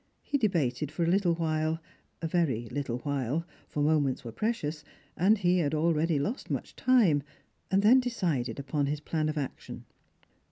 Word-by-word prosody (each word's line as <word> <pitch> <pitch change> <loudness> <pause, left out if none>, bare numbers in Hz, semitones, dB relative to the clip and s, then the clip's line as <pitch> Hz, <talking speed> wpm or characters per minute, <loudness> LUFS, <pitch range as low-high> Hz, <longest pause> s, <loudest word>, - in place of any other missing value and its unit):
He 285 - -1
debated 155 - 0
for 170 - -1
a - - +1
little 175 -1 +3
while 160 -1 0 0.2
— - - -42
a - - +1
very 145 -9 0
little 125 -2 -3
while 145 +2 -1
— - - -29
for 145 - -1
moments 145 -4 +2
were 115 - -6
precious, 160 - -2 0.3
and 200 +6 +4
he 180 -2 +2
had 155 -2 0
already 160 0 +2
lost 205 - -3
much - - -4
time, 230 - +4 0.5
an^i 195 +1 +2
'ohen 250 +5 +8
decided 170 - -1
upon 140 +1 -1
his 150 +1 -1
plan 155 0 -1
of 155 - -3
action. 140 -3 -5
155 Hz, 175 wpm, -29 LUFS, 145-180 Hz, 0.5 s, ohen